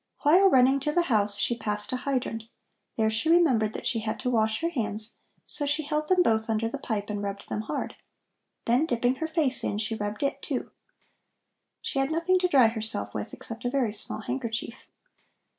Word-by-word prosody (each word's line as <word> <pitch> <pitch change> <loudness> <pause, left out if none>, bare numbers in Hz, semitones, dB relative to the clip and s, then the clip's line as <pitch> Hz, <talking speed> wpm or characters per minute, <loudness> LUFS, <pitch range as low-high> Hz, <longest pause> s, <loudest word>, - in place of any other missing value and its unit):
While 360 +7 +6
running 265 -1 +5
to 300 +2 -1
the 345 +3 +2
house, 205 -1 +3
she 240 - +1
passed 210 +1 -3
a - - 0
hydrant. 250 -4 -2 0.5
There 220 -1 +2
she 225 +9 0
remembered 260 -11 +4
that - - -6
she 230 - +1
had 220 0 -3
to 250 -1 0
wash 220 0 +1
her 335 - +1
hands, 220 -6 -3 0.3
so 290 - -3
she 295 +2 +1
held 300 +1 -2
them 365 0 +4
both 220 -3 +1
under 225 0 +1
the 275 +5 -5
pipe 210 -4 -3
and 205 -1 -3
rubbed 200 0 -5
them 215 - -2
hard. 215 - -4 0.7
Then 250 +7 +3
dipping 245 0 +1
her 320 - -2
face 315 -6 0
in, 205 - -1
she 215 +1 -2
rubbed 210 +2 -3
it, 280 - -1
too. - - -3 1.1
She 275 - -1
had 270 +1 +1
nothing 335 +3 +2
to 360 - +2
dry 275 -8 +6
herself 220 0 -3
with - - -4
except 230 +1 -7
a 245 - 0
very 250 -5 0
small 215 0 -3
handkerchief. 235 -1 -3
240 Hz, 200 wpm, -27 LUFS, 220-290 Hz, 1.1 s, While